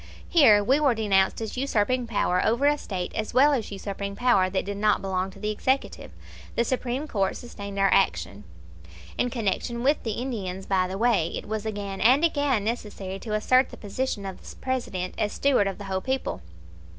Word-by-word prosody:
Here 225 -12 +6
we 265 +7 +3
were 280 -5 +3
denounced 200 -2 +2
as 220 - -4
usurping 250 -1 0
power 180 -5 +1
over 235 +5 +2
a 295 +1 +5
State 180 -3 -4
as 215 - -4
well 285 +3 +6
as 235 -7 -2
usurping 200 0 -5
power 200 -5 +3
that 190 0 -1
did 200 0 -4
not 210 0 +2
belong 190 -1 -2
to 195 +1 -14
the 210 +1 -1
executive. 260 +5 -1 0.5
The 235 - +2
Supreme 255 +3 -2
Court 195 -7 -1
sustained 200 -4 -8
our 195 -1 +3
action. 85 +5 +1 0.8
In 245 - +2
connection 235 +1 -2
with 285 +3 +2
the 225 - -3
Indians, 200 -7 -4
by 185 -2 +1
the 190 +1 -5
way, 220 -7 +2
it - - -6
was 215 0 -3
again 200 -2 -4
and 265 +8 +5
again 285 -9 +1
necessary 205 -4 -4
to 215 0 -3
assert 255 +4 +3
the - - -11
position 205 0 -3
of 190 -1 -7
the - - -11
President 220 -9 -3
as 210 - 0
steward 270 -8 +2
of 195 - -4
the 205 - -8
whole 190 -1 -2
people. 260 - -2
210 Hz, 195 wpm, -26 LUFS, 195-250 Hz, 0.8 s, Here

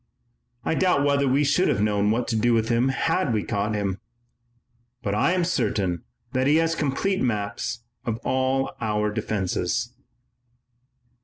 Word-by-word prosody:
I - - +1
doubt 170 -4 +2
whether 140 -1 +2
we 135 +3 +3
should 145 +6 +3
have - - +1
known 105 0 +2
what 115 +3 0
to 115 - 0
do 115 +2 +3
with 110 0 +1
him 120 +2 +2
had 165 +2 0
we 110 -3 0
caught 105 0 -1
him, 100 -2 -2 1.0
but 100 - -1
I 110 - +2
am 185 -1 +1
certain 100 - 0 0.3
that 130 0 +1
he 150 - +5
has 165 0 +2
complete 165 +6 0
maps 105 -1 -2 0.2
of 115 -2 -2
all 130 +1 0
our 105 -1 0
defenses." 105 +1 -2
120 Hz, 155 wpm, -24 LUFS, 105-140 Hz, 1.0 s, he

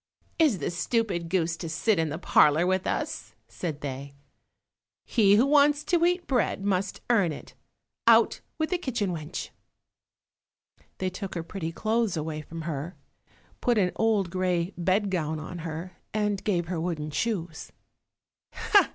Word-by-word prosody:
"Is 300 -11 +4
the 150 - -2
stupid 175 -1 -1
goose 170 -2 +1
to 165 0 -5
sit 175 +5 +1
in 160 -1 +1
the 155 - -3
parlour 155 -1 +4
with 185 0 +1
us?" - - -3
said 155 -5 -5
they. 140 0 -6 0.9
"He 205 -4 +4
who 230 +5 +5
wants 290 +1 +4
to 345 -2 +2
eat 355 +1 +2
bread 235 -6 0
must 195 -1 -1
earn 200 -8 +3
it; 150 - -9 0.5
out - - +5 0.2
with 315 +2 -1
the 360 - +1
kitchen 240 - -1
wench." 155 0 -5 1.5
They 185 0 -2
took 190 0 -6
her 170 - -2
pretty 165 -2 -5
clothes 220 0 0
away 155 0 -3
from 165 +2 -8
her, 160 +2 -4 0.7
put 240 -2 +2
an 185 -3 +3
old 210 -5 +1
grey 180 0 0
bedgown 180 -4 0
on 175 +3 -7
her, 165 +2 -6 0.2
and 210 -2 0
gave 180 -5 +1
her 170 -1 -3
wooden 155 -3 -3
shoes. 175 -4 -3
180 Hz, 150 wpm, -27 LUFS, 165-215 Hz, 1.5 s, who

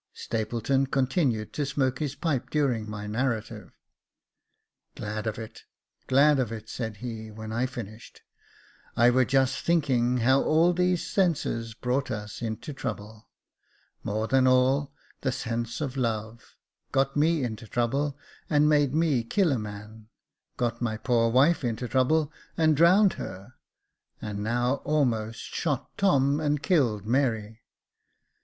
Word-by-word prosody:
Stapleton 120 +5 -1
continued 130 - 0
to 150 - -1
smoke 135 -2 -1
his 145 -2 -3
pipe 140 -3 -2
during 125 -8 0
my 105 -1 -6
narrative. 115 +1 -3 0.6
" - - -53
Glad 105 +1 -4
of 110 - -2
it, 110 -1 -9 0.5
glad 140 +2 +5
of 120 -4 -1
it," 110 -1 -7
said 110 -3 -5
he, 110 -2 -6
when 110 0 -8
I 120 +3 0
finished. 115 -3 -9 0.4
" - - -28 0.3
I 120 +1 +6
were 130 +1 +3
just 135 +1 +2
thinking 130 -7 +1
how 130 +3 +3
all 165 +3 +3
these 180 0 +1
senses 125 - 0
brought 125 +3 -1
us 105 +1 -6
into 115 +5 -4
trouble, 110 -4 -7 0.7
more 110 +2 -2
than 130 +1 +3
all, 130 +3 +3 0.3
that 130 -2 0
sense 115 +3 -3
of 135 -3 -3
love: 115 -2 -3 0.4
got 135 0 +1
me 155 0 +2
into 110 -2 -5
trouble, 135 +6 -1 0.3
and 150 -1 +4
made 145 -2 +3
me 155 -7 +2
kill 175 - +1
a 130 - 0
man, 105 +1 -9 0.3
— - - -53
got 120 -1 -1
my 110 -3 -1
poor 115 0 +2
wife 140 +7 +3
into 120 0 -2
trouble, 145 +6 +1 0.2
and 155 -1 +4
drowned 185 +6 +5
her, 95 +6 -8 0.3
— - - -51
and 105 -1 -5
now 120 +5 0
almost 120 -7 -1
shot 145 -4 -3
Tom, 145 -9 +3
and 150 -2 0
killed 120 - +1
Mary. 115 -3 0
125 Hz, 150 wpm, -27 LUFS, 110-145 Hz, 0.7 s, I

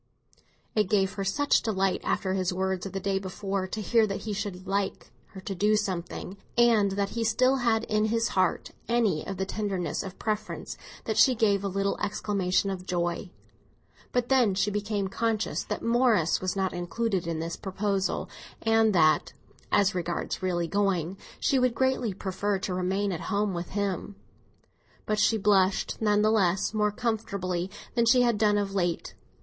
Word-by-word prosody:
It 210 -3 +1
gave 195 -2 +2
her 195 - -3
such 285 +10 +2
delight, 195 -3 0
after 190 -1 0
his 185 -1 0
words 190 0 -1
of - - -8
the 195 - -3
day 195 0 0
before, 195 0 -3
to 215 - -5
hear 225 +1 +3
that 195 - -4
he 215 - -4
should 195 -3 -4
"like" 195 0 -2 0.2
her 190 - -11
to 195 - -4
do 210 +3 +2
something, 190 -1 -3 0.2
and 225 -5 +4
that 200 0 -1
he 230 +2 -2
still 255 +4 +3
had 230 -3 +1
in 215 -1 +1
his 230 +1 +1
heart 185 -2 0 0.2
any 220 -10 +2
of 195 - -4
the 190 - -1
tenderness 195 -3 -2
of 190 -1 -8
preference, 215 -1 -3 0.3
that - - -2
she 260 -2 +6
gave 205 -4 +2
a - - 0
little 195 +1 -1
exclamation 200 -2 0
of 185 -1 -6
joy. 175 +1 -1 0.8
But 245 -1 0
then 245 -7 +4
she 205 +2 +1
became 205 -1 -1
conscious 220 +2 -1
that - - -4
Morris 230 -8 +3
was 185 0 -1
not 190 -1 0
included 180 +1 -2
in 165 -1 -2
this 165 +1 -3
proposal, 195 0 -2 0.4
and 225 -2 +3
that—as 165 +5 +1
regards 175 -1 -3
really 175 -2 0
going—she 195 - 0
would 250 -2 +2
greatly 260 -4 +1
prefer 200 +1 -1
to 185 0 -3
remain 190 +2 0
at 170 - -4
home 205 -1 0
with 170 0 -4
him. 200 0 -2 0.9
But 215 0 0
she 220 +1 +3
blushed, 200 0 +2
none 210 -1 +3
the 215 - +4
less, 195 -2 +2
more 210 -1 +2
comfortably 200 -6 -2 0.2
than 235 -1 +2
she 250 +1 +6
had 235 -4 +2
done 210 -1 +3
of 200 -1 -1
late. 175 -3 -1
200 Hz, 175 wpm, -27 LUFS, 185-215 Hz, 0.9 s, she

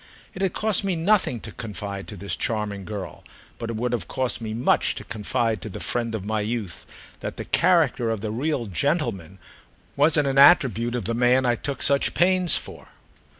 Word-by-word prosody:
It 190 - -7
had 190 -3 0
cost 215 -2 0
me 195 -2 0
nothing 170 - +2
to - - -8
confide 100 -3 -6
to 105 - -7
this 100 +2 -3
charming 105 -4 -3
girl, 105 -2 -7 0.4
but 115 -1 -4
it 115 - -3
would 120 +2 -2
have 110 -8 -2
cost 130 -2 -2
me 110 -1 -4
much 115 +3 +1
to - - -6
confide 110 0 -2
to 110 - -6
the 95 - -7
friend 115 -2 -2
of 100 -3 -5
my 110 0 -1
youth, 105 -4 -4 0.3
that - - -6
the - - -5
character 160 -9 +2
of 110 -3 -2
the 110 0 -3
"real 130 +2 -1
gentleman" 100 - -2 0.6
wasn't 145 0 +3
an 135 0 +2
attribute 125 -6 +5
of 120 - -3
the 115 - -1
man 125 +2 +3
I 120 - +3
took 140 +3 -4
such 140 0 +2
pains 185 0 +4
for. - - -9
120 Hz, 195 wpm, -24 LUFS, 110-145 Hz, 0.6 s, attribute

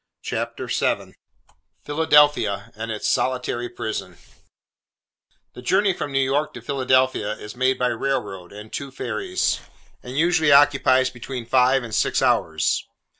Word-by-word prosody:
CHAPTER - - -4
VII - - -1 0.7
PHILADELPHIA, 145 -9 +3
AND 110 +1 -6
ITS 110 -1 -3
SOLITARY 125 -1 -1
PRISON 110 -2 -5 1.4
THE - - -10
journey 195 +9 +2
from 145 - -5
New 135 - -1
York 135 +3 0
to 125 - -8
Philadelphia, 130 -4 +1
is 105 0 -10
made 130 +1 +1
by 125 0 +1
railroad, 115 -8 -3
and 105 +2 -11
two 140 - -4
ferries; 370 - -2 0.4
and 125 +2 -8
usually 160 -2 +3
occupies 135 -2 +5
between 125 0 -7
five 130 +2 +3
and 115 -2 -8
six - - +1
hours. - - +1
130 Hz, 130 wpm, -23 LUFS, 120-145 Hz, 1.4 s, occupies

